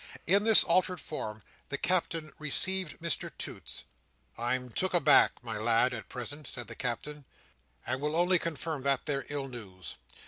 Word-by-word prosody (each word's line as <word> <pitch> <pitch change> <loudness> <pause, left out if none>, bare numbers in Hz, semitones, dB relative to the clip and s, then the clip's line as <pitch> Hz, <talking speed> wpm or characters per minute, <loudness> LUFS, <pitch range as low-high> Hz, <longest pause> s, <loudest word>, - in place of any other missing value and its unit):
In 200 +5 +2
this 225 -2 +8
altered 180 +1 +1
form, 110 -9 -6 0.3
the 140 - -3
Captain 165 -2 -1
received 180 +3 +4
Mr 170 -1 -1
Toots. - - -6 0.5
"I'm 125 +1 -2
took 185 +8 -1
aback, 170 - +5
my 115 -3 -4
lad, 115 +3 +3
at 115 - -8
present," 145 +5 -4
said 120 -2 -2
the - - -7
Captain, 140 +4 -4 0.6
"and 130 +2 -2
will 150 +1 -2
only 175 +1 +3
confirm 160 -2 -4
that 140 -1 +1
there 140 -3 -2
ill 140 -1 -3
news. 95 - -10
145 Hz, 160 wpm, -29 LUFS, 125-170 Hz, 0.6 s, this